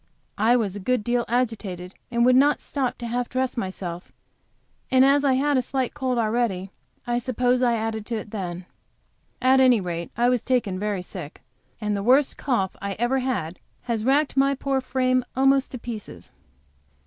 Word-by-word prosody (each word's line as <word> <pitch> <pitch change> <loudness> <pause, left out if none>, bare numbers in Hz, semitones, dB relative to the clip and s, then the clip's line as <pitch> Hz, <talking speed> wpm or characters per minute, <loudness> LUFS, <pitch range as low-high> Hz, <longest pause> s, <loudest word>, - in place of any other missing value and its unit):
He 235 +2 +5
was 210 -5 0
a - - -5
good 245 +3 0
deal 240 +1 0
agitated, 210 -7 -2 0.2
and 235 0 +2
would 250 0 +5
not 285 +3 +4
stop 265 -4 -3
to 240 - -6
half 240 +1 -2
dress 255 0 -1
myself, 185 -5 -5 0.8
and 260 0 +5
as 280 +1 +4
I 275 -2 +3
had 280 +2 +2
a - - +3
slight 260 0 -2
cold 260 -4 -1
already, 215 -4 0 0.3
I 240 0 0
suppose 250 +1 +1
I 240 -2 +3
added 220 -1 -3
to 235 - -2
it 215 -1 -6
then. 180 -4 -5 0.8
At 260 +1 +5
any 255 -3 +5
rate 170 -2 -4
I 240 +1 +3
was 250 -2 +2
taken 235 -8 0
very 205 -3 -2
sick, 175 -5 -9 0.4
and 210 -1 -1
the 200 - -2
worst 260 +6 +3
cough 235 -9 -1
ever 240 +7 0
had 205 -10 -3 0.2
has 230 -3 -2
racked 275 +4 +2
my 275 0 +3
poor 270 0 -1
frame 255 0 +1
almost 270 +1 +3
to - - -3
pieces. 215 - -8
240 Hz, 180 wpm, -24 LUFS, 205-260 Hz, 0.8 s, He